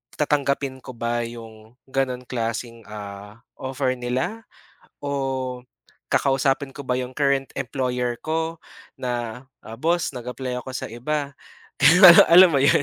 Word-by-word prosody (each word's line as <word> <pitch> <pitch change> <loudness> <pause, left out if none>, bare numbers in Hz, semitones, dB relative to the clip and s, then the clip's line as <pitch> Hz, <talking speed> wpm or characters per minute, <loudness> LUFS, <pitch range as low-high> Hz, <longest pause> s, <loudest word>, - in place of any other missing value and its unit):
tatanggapin 140 -2 0
ko 130 - -10
ba 120 +1 -1
yung 115 -1 -12 0.2
ganong 130 -2 -1
klaseng 115 -1 -4
ah, 105 +2 -9 0.2
offer 130 0 -1
nila? 130 - -3 0.6
O 130 -3 -3 0.4
kakausapin 135 0 +1
ko 145 - -10
ba 125 - +2
'yong 130 0 -4
current 140 -1 0
employer 125 -2 -2
ko 160 +1 -2 0.4
na, 120 0 -4 0.4
"Boss 170 +2 +1
nag-apply 125 +1 -5
ako 130 - -9
sa - - -5
iba." 140 +4 -3 1.0
Alam 175 -4 +8
mo - - +4
yon? 140 +1 +4
130 Hz, 120 wpm, -23 LUFS, 120-140 Hz, 1.0 s, Alam